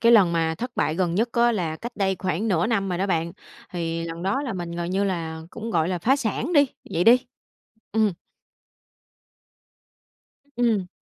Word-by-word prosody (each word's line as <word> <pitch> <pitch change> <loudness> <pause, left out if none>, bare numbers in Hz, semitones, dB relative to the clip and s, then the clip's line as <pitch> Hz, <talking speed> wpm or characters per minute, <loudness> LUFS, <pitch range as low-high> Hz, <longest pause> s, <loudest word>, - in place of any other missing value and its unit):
cái 230 0 +6
lần 195 -7 +6
mà 165 -1 +1
thất 245 +1 -5
bại 155 - +1
gần 175 -1 0
nhất 225 +5 +2
á, 235 0 +4
là 170 -7 -2
cách 240 +7 -7
đây 190 -2 +1
khoảng 190 +3 -1
nửa 180 -1 +2
năm 200 -4 0
rồi 175 - -2
đó 195 - +1
bạn. 170 -3 0 0.4
Thì 165 -1 -2
lần 165 0 -6
đó 200 +9 0
là 255 -6 -3
mình 175 -2 -5
gần 170 0 -3
như 195 +2 +1
là 165 -4 -3
cũng, 230 +1 -6
gọi 165 -2 +1
là, 180 - -1
phá 255 +11 +3
sản 260 - -2
đi, 285 -3 +6 0.2
vậy 170 +2 +1
đi. 250 +4 +6 0.7
Ừm. 215 -2 +3 2.4
Ừm. 225 -6 +2
190 Hz, 190 wpm, -24 LUFS, 170-230 Hz, 2.4 s, cái